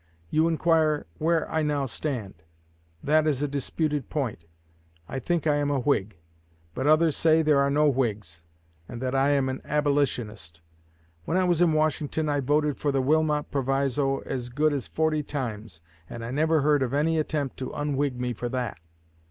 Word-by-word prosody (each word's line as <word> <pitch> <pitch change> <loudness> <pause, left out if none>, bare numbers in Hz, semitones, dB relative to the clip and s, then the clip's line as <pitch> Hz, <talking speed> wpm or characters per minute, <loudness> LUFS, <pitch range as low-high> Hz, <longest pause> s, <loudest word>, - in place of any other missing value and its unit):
You 160 +1 +3
inquire 160 -2 +2
where 165 0 +1
I 160 - -1
now 145 -2 0
stand. 120 -5 -4 0.7
That 155 +1 +3
is 145 -2 0
a - - +1
disputed 145 0 -2
point. 125 - -3 0.6
I 135 - -4
think 165 +5 -1
I 150 -2 +3
am 145 0 0
a 145 - +1
Whig; 110 - 0 0.6
but 130 +8 -2
others 155 0 +4
say 160 0 +3
there 150 -2 +4
are 140 0 +3
no 150 +2 +3
Whigs, 105 - -1 0.5
and 120 - -7
that 130 +1 -2
I 135 +1 +3
am 140 -2 +2
an 130 0 -4
Abolitionist. 125 - -1 0.6
When 175 - 0
I 185 - +3
was 175 -2 +2
in 170 -3 +4
Washington 155 0 0
I 145 -1 +1
voted 145 +2 +1
for 145 - 0
the 135 - +1
Wilmot 150 +2 +1
Proviso 135 0 0
as 125 -2 -4
good 150 +4 +1
as 140 -3 -3
forty 160 -1 0
times, 110 - -6 0.3
and 115 -1 -7
I 120 - -5
never 155 +3 +2
heard 145 0 +3
of 130 +1 -1
any 160 +2 +2
attempt 150 -3 -2
to 130 - -4
unwhig 145 -2 -1
me 125 0 -2
for 120 +2 -4
that. 125 -8 -3
145 Hz, 180 wpm, -26 LUFS, 130-155 Hz, 0.7 s, others